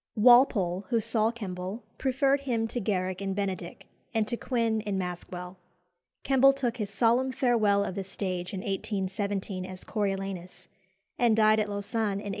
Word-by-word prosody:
Walpole, 210 -6 +5
who 235 - +2
saw 220 0 +1
Kemble, 200 -1 -5 0.2
preferred 270 +1 +2
him 235 -5 -1
to 245 - -2
Garrick 185 -3 -1
in 195 -1 -2
Benedick, 190 -4 -4 0.3
and 220 -1 +2
to 240 - -1
Quin 230 -3 0
in 205 -2 -2
Maskwell. 180 0 -5 0.7
Kemble 270 0 +5
took 250 -3 -2
his 210 -4 -3
solemn 240 +5 +2
farewell 225 -6 +2
of 190 - -3
the 195 +1 -3
stage 185 -2 -4
in 190 - -4
1817 195 -1 -3
as 185 0 -8
Coriolanus, 195 -3 -4 0.5
and 235 -3 +4
died 215 0 +5
at 210 -1 0
Lausanne 205 +1 -1
in 195 - -3
1823. 205 - -5
205 Hz, 160 wpm, -28 LUFS, 190-235 Hz, 0.7 s, Walpole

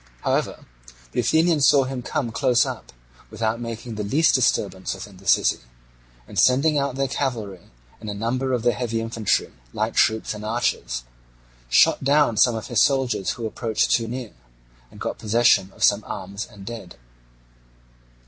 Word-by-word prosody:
However, - - -1 0.5
the - - -2
Athenians 160 +4 +3
saw 140 -2 +5
him 130 -1 -5
come 120 -1 -3
close 125 0 +2
up, - - -7 0.4
without 115 +1 -2
making 115 0 -6
the 105 -1 -4
least 145 +11 +3
disturbance 100 -7 0
within 95 0 -10
the 95 - -15
city; - - +3 0.7
and - - -3
sending 140 +5 +4
out 140 -2 -2
their 135 0 0
cavalry, 115 -9 -4 0.3
and 110 - -7
a 105 - -4
number 125 +5 -2
of 125 -3 -1
their 120 0 +3
heavy 115 -2 -2
infantry, 115 -2 -1 0.2
light - - -1
troops, 110 0 +2
and 105 0 -8
archers, 105 - -2 0.7
shot 65 - +4
down 140 -3 +3
some 120 +2 +4
of 110 - -5
his 120 -4 +1
soldiers 130 -8 +1
who 115 - -6
approached 110 0 -1
too 115 -1 +2
near, 125 -1 -6 0.6
and - - -15
got - - -4
possession 110 -3 +3
of - - -7
some 105 +1 +4
arms 100 +2 -6
and 100 -4 -13
dead. 110 -6 -8
115 Hz, 165 wpm, -23 LUFS, 105-130 Hz, 0.7 s, saw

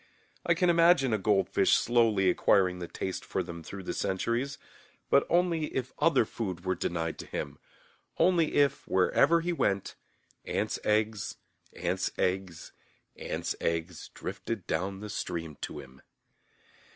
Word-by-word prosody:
I 170 - +2
can 180 +1 +2
imagine 165 -7 +4
a 110 - +1
goldfish 95 0 +2
slowly 115 -5 +3
acquiring 90 -1 +3
the 85 - -5
taste 95 +2 -4
for 95 - -2
them 85 -1 -8
through 95 +4 -8
the 90 - -3
centuries, 115 +8 -1 0.5
but 140 - +4
only 170 -2 +2
if 130 -1 -2
other 165 -8 +4
food 95 -6 -5
were 95 - +1
denied 85 -2 -3
to - - -7
him, 70 0 -5 0.6
only 175 -3 +3
if, 145 -1 +2
wherever 130 - +3
he 175 +1 -1
went, 100 - 0 0.5
ants' - - -2
eggs, 105 -1 0 0.4
ants' - - -1
eggs, 90 -3 -2 0.4
ants' - - -3
eggs 85 0 -2
drifted 110 -6 -5
down 95 +4 -2
the 105 - -6
stream 80 -5 -4
to - - -5
him. 65 -2 -12
100 Hz, 140 wpm, -29 LUFS, 90-135 Hz, 0.6 s, imagine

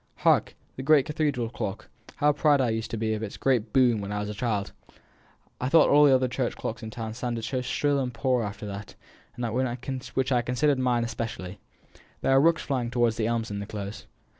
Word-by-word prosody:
Hark! - - +3 0.2
the - - -4
great 140 0 +4
cathedral 145 -7 -1
clock. 105 -3 -5 0.3
How 150 0 +3
proud 145 0 +3
I 125 -3 +2
used 110 0 -3
to 115 - -3
be 110 0 0
of 110 - -3
its 110 -2 -5
great 120 -5 +1
boom 120 -5 +3
when 100 0 -5
I 105 - -2
was 105 0 -3
a - - -4
child! 105 -2 -2 0.9
I 125 - -1
thought 160 +1 +6
all 145 +1 +7
the 135 -2 +6
other 130 0 +2
church 125 0 -2
clocks 115 - -4
in 110 - -6
the - - -12
town 110 -2 -4
sounded 120 -1 -3
so 130 +2 -2
shrill 140 +3 0
and 130 -2 -2
poor 125 +1 0
after 105 0 -6
that, 100 0 -7 1.2
which 130 0 0
I 125 -2 +3
considered 130 +3 +1
mine 125 -2 +1
especially. 115 -5 -5 0.6
There - - +1
are 135 0 +6
rooks 165 +2 +3
flying 125 -4 -2
home 120 -2 +3
to - - -9
the 110 -1 0
elms 115 -2 -1
in 100 - -3
the 100 - -6
Close. 100 -1 -7
120 Hz, 220 wpm, -27 LUFS, 110-135 Hz, 1.2 s, all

